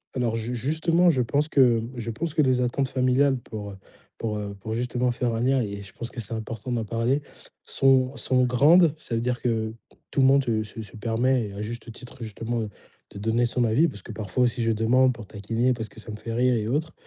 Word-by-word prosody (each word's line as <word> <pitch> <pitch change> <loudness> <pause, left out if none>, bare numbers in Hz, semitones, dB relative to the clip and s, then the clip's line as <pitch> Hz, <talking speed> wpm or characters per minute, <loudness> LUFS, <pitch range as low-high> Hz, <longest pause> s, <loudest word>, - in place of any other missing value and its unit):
Alors 120 -3 0
ju 115 +2 -3
justement, 160 +8 +2
je 135 -6 +2
pense 145 +6 0
que 125 -6 +4
je 115 -1 -4
pense 155 +7 -4
que 155 - +4
les 130 -2 +2
attentes 125 +2 0
familiales 130 +1 +2
pour, 105 -3 -7
heu, 95 - -11 0.4
pour, 110 -2 -2
heu, 100 -1 -5
pour 110 +3 -4
justement 125 +1 0
faire 120 0 -1
un 115 - -1
lien 130 +2 +3
et 100 -2 -4
je 100 - -11
pense 120 +1 -6
que 120 - -5
c'est 115 +1 -4
important 110 +2 -5
d'en 115 -2 -1
parler, 120 +6 0 0.4
sont 135 0 +3
sont 130 -1 +2
grandes. 150 +6 +5
Ça 115 - -3
veut 115 - 0
dire 125 +1 -1
que 110 -2 -1 0.4
tout 140 - +1
le 130 - +6
monde 140 +1 +5
se 110 -2 +1
se 110 +1 -8
se 105 - -12
permet 120 +2 +1
et 100 - -9
à 100 - -5
juste 120 +2 -6
titre, 125 +3 -11
justement, 115 +1 -3
heu, 110 - -4 0.4
de - - -10
donner 115 +3 +1
son 125 +1 +1
avis, 120 +9 +3
parce 105 - -7
que - - -8
parfois 110 +2 -1
aussi, 120 0 +1
je 115 - +2
demande 125 +4 +3
pour 115 -3 -10
taquiner 115 +5 -1
parce 110 -2 -5
que - - -12
ça 110 - -5
me 105 - -6
fait 115 +1 -6
rire 125 +1 +3
et 110 -2 -1
autre. 155 +6 -1
120 Hz, 245 wpm, -25 LUFS, 110-130 Hz, 0.4 s, le